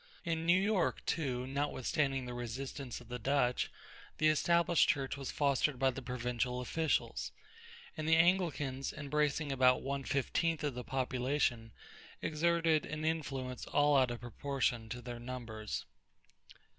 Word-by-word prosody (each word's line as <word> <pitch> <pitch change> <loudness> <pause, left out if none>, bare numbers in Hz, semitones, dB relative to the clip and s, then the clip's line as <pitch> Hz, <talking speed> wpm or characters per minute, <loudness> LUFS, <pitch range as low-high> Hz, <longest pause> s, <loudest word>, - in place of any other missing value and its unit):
In 165 -2 -2
New 175 +2 +6
York, 200 -1 +1
too, 130 -6 -1
notwithstanding 135 0 -1
the 125 - -5
resistance 125 +2 -5
of 120 - -14
the 125 +1 -5
Dutch, 125 0 +1 0.5
the 155 - +4
Established 170 +2 +3
Church 135 -1 0
was 140 -2 -5
fostered 140 -1 +1
by 135 +1 +3
the 135 - -6
provincial 125 0 -2
officials, 160 +5 -1 0.6
and 155 0 -2
the 160 - +7
Anglicans, 165 -6 +2
embracing 150 0 0
about 130 -1 +4
one 140 0 -2
fifteenth 160 +4 0
of 145 -2 0
the 125 0 -5
population, 125 -2 0 0.5
exerted 165 0 +2
an 155 +1 -4
influence 135 -6 -2
all 145 0 +3
out 130 -2 +5
of 120 -2 -5
proportion 120 -1 -1
to 125 +2 -6
their 120 -1 -6
numbers. 120 -3 -5
135 Hz, 140 wpm, -34 LUFS, 125-155 Hz, 0.6 s, the